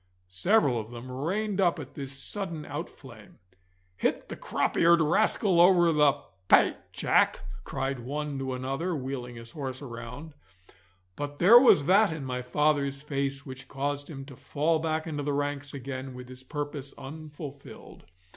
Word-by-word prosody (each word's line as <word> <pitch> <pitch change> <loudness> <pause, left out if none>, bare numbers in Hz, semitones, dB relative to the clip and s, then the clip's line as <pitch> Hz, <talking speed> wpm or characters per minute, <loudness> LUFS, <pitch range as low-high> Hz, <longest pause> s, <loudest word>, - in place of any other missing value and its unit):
Several 140 - +2
of 110 0 -7
them 120 +1 -9
reined 195 +9 -1
up 175 -2 +3
at 145 -2 -8
this 135 -2 -6
sudden 165 +3 -3
out - - -5
flame. - - -15 0.6
'Hit - - -1
the - - -5
crop - - -1
eared 170 0 +5
rascal 175 +2 +3
over 175 -2 +6
the 150 -3 +5 0.3
pate, - - +5
Jack!' - - +2 0.2
cried 135 -1 -3
one 145 +3 -4
to 130 -1 -3
another, 135 +8 -2
wheeling 130 -3 -5
his 115 0 -10
horse 130 -3 -5
round; 125 +4 -8 0.8
but 145 +3 -5
there 215 +10 +9
was 235 - +6
that 200 +3 +5
in 155 -4 -5
my 125 -1 -3
father's 140 +1 0
face 140 -1 -2
which 130 0 -9
caused 145 +1 -3
him 135 -4 -7
to 135 -2 -11
fall 155 +5 0
back 160 0 -1
into 150 -3 -3
the 145 0 -1
ranks 145 0 -2
again 130 -1 -6
with 125 0 -9
his 130 0 -10
purpose 145 0 -5
unfulfilled. 145 -1 -10
145 Hz, 160 wpm, -28 LUFS, 130-160 Hz, 0.8 s, there